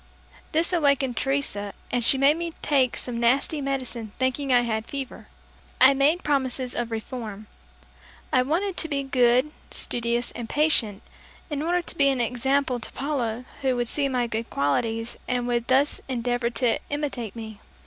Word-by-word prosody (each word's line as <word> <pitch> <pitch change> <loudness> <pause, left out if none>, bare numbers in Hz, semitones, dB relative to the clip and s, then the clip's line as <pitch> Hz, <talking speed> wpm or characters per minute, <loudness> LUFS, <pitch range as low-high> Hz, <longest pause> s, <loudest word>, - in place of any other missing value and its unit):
This 330 +3 +1
awakened 280 -6 +2
Teresa, 270 -8 -2 0.2
and 245 - 0
she 265 - +10
made 275 +3 +4
me 335 0 -4
take 265 -4 +2
some 240 -2 -4
nasty 265 +5 +2
medicine 260 -4 -3
thinking 260 +2 -1
I 245 -1 +5
had 220 -2 -2
fever. 275 -2 -6 0.5
I 260 +2 +8
made 290 +6 +2
promises 260 -3 -1
of 240 -1 -3
reform. 220 -2 -6 0.9
I 255 - +5
wanted 345 +8 -1
to 325 - 0
be 280 -2 -1
good, 255 +1 +3 0.2
studious 235 0 -1
and 230 -1 -7
patient, 260 -9 +3 0.5
in 290 -1 -2
order 350 +2 0
to - - -5
be 280 -3 +4
an 265 -2 0
example 250 +2 0
to - - -7
Paula 255 -4 -3 0.2
who 260 -2 +1
would 240 -1 -1
see 280 +3 -1
my 250 -2 0
good 230 0 -4
qualities 225 - -1
and 245 -1 -1
would 240 -1 -1
thus 270 +3 +2
endeavor 245 -1 -1
to 235 0 +1
imitate 270 -8 -3
me. 220 -2 -8
255 Hz, 165 wpm, -25 LUFS, 235-280 Hz, 0.9 s, she